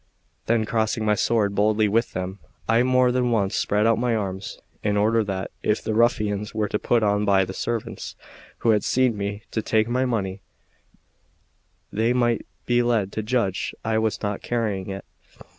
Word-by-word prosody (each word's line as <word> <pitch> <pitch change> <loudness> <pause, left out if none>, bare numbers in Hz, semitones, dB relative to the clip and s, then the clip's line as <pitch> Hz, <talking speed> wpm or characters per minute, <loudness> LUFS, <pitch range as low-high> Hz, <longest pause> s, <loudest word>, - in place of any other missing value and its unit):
Then 115 -1 +2
crossing 110 0 0
my 105 - +3
sword 105 -1 +1
boldly 105 +1 +3
with 115 +3 +1
them, 95 +2 -4 0.3
I 115 +1 +4
more 125 0 +3
than 125 -1 +1
once 100 -4 +1
spread 105 +1 +1
out 115 -1 +3
my 120 -1 +1
arms, 95 -2 -4 0.2
in 105 -1 0
order 110 +2 +3
that, 95 -1 -4
if 105 - 0
the 110 - -1
ruffians 105 -2 +1
were 110 -1 0
put 115 +3 +1
on 105 0 +2
by 100 -2 +3
the 95 - -7
servants 115 +2 -4 0.5
who 115 - +6
had 105 -2 +2
seen 130 -3 +2
me 100 +1 -4
take 110 0 +1
my 125 +2 +1
money, 100 -6 -2 1.5
they 115 +3 +2
might 120 -2 +1 0.2
be 120 0 +3
led 115 -5 +1
to 110 - -3
judge 105 -4 -1
I 110 0 +1
was 110 -1 -1
not 105 -1 -2
carrying 105 -5 -2
it. 95 -1 -6
110 Hz, 175 wpm, -24 LUFS, 100-115 Hz, 1.5 s, who